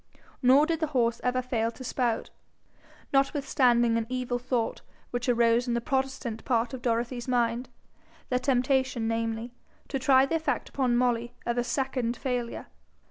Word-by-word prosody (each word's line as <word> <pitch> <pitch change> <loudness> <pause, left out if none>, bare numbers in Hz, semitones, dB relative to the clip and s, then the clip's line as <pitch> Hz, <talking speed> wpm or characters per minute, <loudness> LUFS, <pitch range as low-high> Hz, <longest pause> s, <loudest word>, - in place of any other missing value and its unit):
Nor 265 +3 +6
did 325 0 -1
the 315 - 0
horse 235 -1 +1
ever 255 0 +1
fail 230 -3 0
to 245 +3 -10
spout, 245 -2 -1 0.8
notwithstanding 255 -4 +3
an 225 -1 -2
evil 250 -1 -2
thought 245 -2 -2 0.3
which 245 +1 -2
arose 235 0 +3
in 240 - 0
the - - +1
protestant 265 -3 -2
part 240 0 0
of 260 - -5
Dorothy's 240 +1 -1
mind 240 0 0 0.6
the 250 - +1
temptation, 260 -2 +1
namely, 225 +1 -2 0.4
to 270 - -2
try 265 0 +5
the 275 - -4
effect 300 -5 -2
upon 250 -3 +1
Molly 240 -1 0
of 235 0 0
a - - +1
second 245 -1 -1
failure. 245 -3 -3
245 Hz, 155 wpm, -28 LUFS, 235-260 Hz, 0.8 s, Nor